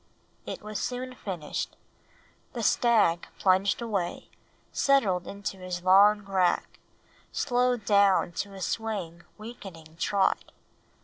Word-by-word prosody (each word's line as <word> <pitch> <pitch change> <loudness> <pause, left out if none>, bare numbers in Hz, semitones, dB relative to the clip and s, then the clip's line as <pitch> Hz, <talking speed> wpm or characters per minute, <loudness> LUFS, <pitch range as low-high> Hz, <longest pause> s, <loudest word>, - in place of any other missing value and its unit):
It - - -6
was 215 0 -5
soon 255 +1 -4
finished. 180 -10 -5 0.8
The 235 - -4
stag 215 -7 +3
plunged 195 +4 +2
away, 200 -6 -3 0.4
settled 205 -11 +2
into 200 0 -5
his 180 -1 -5
long 200 +3 +6
rack, 190 -3 0 0.5
slowed 245 -3 0
down 200 -3 +4
to 200 -1 -10
a 190 - -9
swaying, 190 -5 -3 0.2
weakening 190 -8 -11
trot. 200 +3 0
200 Hz, 110 wpm, -28 LUFS, 185-225 Hz, 0.8 s, long